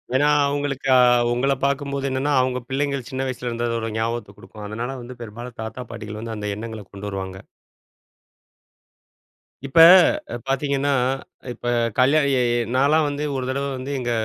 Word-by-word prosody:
ஏன்னா 145 +3 +4 0.2
அவங்களுக்கு. 140 -1 -2
ஆ, - - +7 0.4
உங்கள 135 +3 +1
பாக்கும் 140 0 -1
போது 140 0 -2
என்னன்னா 135 +2 -1
அவங்க 125 0 -1
பிள்ளைங்கள் 140 -1 -2
சின்ன 135 -1 -3
வயசுல 125 -1 -4
இருந்ததோட 115 0 -2
ஒரு 115 0 -3
ஞாபகத்த 115 +1 -3
குடுக்கும். 105 -1 -11
அதனால 120 +5 -4
வந்து 120 0 -10
பெரும்பாலும் 120 +2 -8
தாத்தா, 110 +3 -6
பாட்டிகள் 105 0 -7
வந்து 115 -1 -5
அந்த 105 0 -4
எண்ணங்கள 110 0 -7
கொண்டு 100 +1 -7
வருவாங்க. 95 -1 -6 2.3
இப்ப 135 - +2 0.7
பாத்தீங்கன்னா, 140 +1 0 0.6
இப்ப 120 - -10 0.3
கல்யா 135 +5 +4
இ - - +2 0.4
நாலாம் 150 +4 +3
வந்து 145 +1 -3
ஒரு 130 - -2
தடவ 140 +1 -1
வந்து 130 +2 -6
எங்க. 120 -1 -2
130 Hz, 150 wpm, -22 LUFS, 115-140 Hz, 2.3 s, ஆ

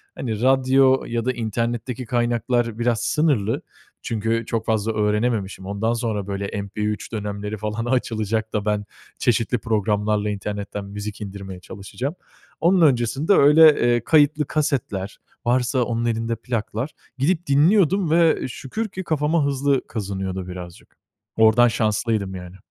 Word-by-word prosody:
hani 110 -4 -4
radyo 130 +1 +4
ya 115 -1 -2
da 130 - +2
internetteki 120 +2 -3
kaynaklar 120 -1 0
biraz 120 -1 +1
sınırlı. 140 -9 +1 0.4
Çünkü 115 0 -1
çok 110 -1 -2
fazla 110 0 0
öğrenememişim. 105 -2 -1
Ondan 100 +4 -1
sonra 110 -4 -2
böyle 100 0 -3
MP3 105 +1 -3
dönemleri 105 0 -4
falan 105 +2 -3
açılacak 110 -3 -1
da 105 -1 -1
ben 105 -1 0 0.3
çeşitli 120 0 +1
programlarla 105 -1 0
internetten 100 0 -4
müzik 105 +1 -7
indirmeye 95 -2 -7
çalışacağım. 105 - -6 0.5
Onun 180 +2 +4
öncesinde 135 - +3
öyle, 150 -5 +6
ııı, 120 - +1
kayıtlı 150 +1 +3
kasetler, 130 -11 -2 0.3
varsa 125 +1 +2
onun 120 0 -2
elinde 115 0 -1
plaklar. 115 +3 -3 0.3
Gidip 165 +6 0
dinliyordum 170 +4 +3
ve 165 -3 +3
şükür 140 - -5
ki 190 0 -6
kafama 155 -1 +1
hızlı 140 -1 0
kazınıyordu 95 -3 -4
birazcık. 90 -1 -10 0.4
Ordan 110 +2 +6
şanslıydım 110 -3 0
yani. 90 0 -9
115 Hz, 130 wpm, -22 LUFS, 105-130 Hz, 0.5 s, öyle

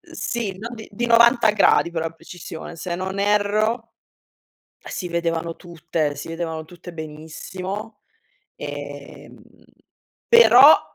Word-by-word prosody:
Uhm, 345 -1 -19
sì, 230 - -3
no 230 +3 -6
dì 220 -1 -10
di 240 +4 -2
90 235 -1 +5
gradi 200 -4 +3
per 165 -1 -3
la 165 - -2
precisione. 165 0 -10
Se 175 +1 -4
non 190 +2 -4
erro, 210 +3 +1 0.8
si 180 - -6
vedevano 170 -1 -2
tutte, 165 -3 -3
si 145 - -7
vedevano 165 -1 -4
tutte 175 +2 -12
benissimo, 180 +7 -7 0.6
ehm, 145 -1 -8 0.9
però 470 0 +7
180 Hz, 120 wpm, -22 LUFS, 165-215 Hz, 0.9 s, però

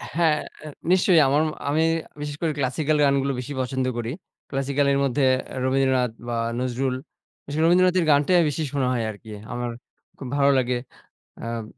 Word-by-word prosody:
হ্যাঁ। 160 -3 +3 0.2
অ্যা 155 - -8 0.2
নিশ্চয়ই। 185 -2 +5
আমার 145 +3 +3 0.3
আমি 155 +2 +2 0.4
বিশেষ 145 0 -4
করে 165 -2 +1
ক্লাসিকাল 145 +4 0
গানগুলো 140 0 +2
বেশি 135 +3 -6
পছন্দ 130 +1 -2
করি। 120 +1 -3 0.4
ক্লাসিকাল 140 +1 0
এর 140 - +2
মধ্যে 140 +1 +1 0.4
রবীন্দ্রনাথ 130 -2 +2 0.2
বা 120 - -2 0.2
নজরুল। 130 +1 -1 0.5
বিশেষ 145 +2 -4
রবীন্দ্রনাথের 180 0 +4
গানটাই 165 +5 +4
বেশি 155 +2 -3
শোনা 135 -3 0
হয় 115 -2 -1
আরকি। 110 +1 -12 0.2
আমার 120 -1 -3 0.5
খুব 130 - -7
ভালো 140 0 +4
লাগে। 125 -1 +1 0.7
আম 115 -1 -4
140 Hz, 155 wpm, -24 LUFS, 125-150 Hz, 0.7 s, নিশ্চয়ই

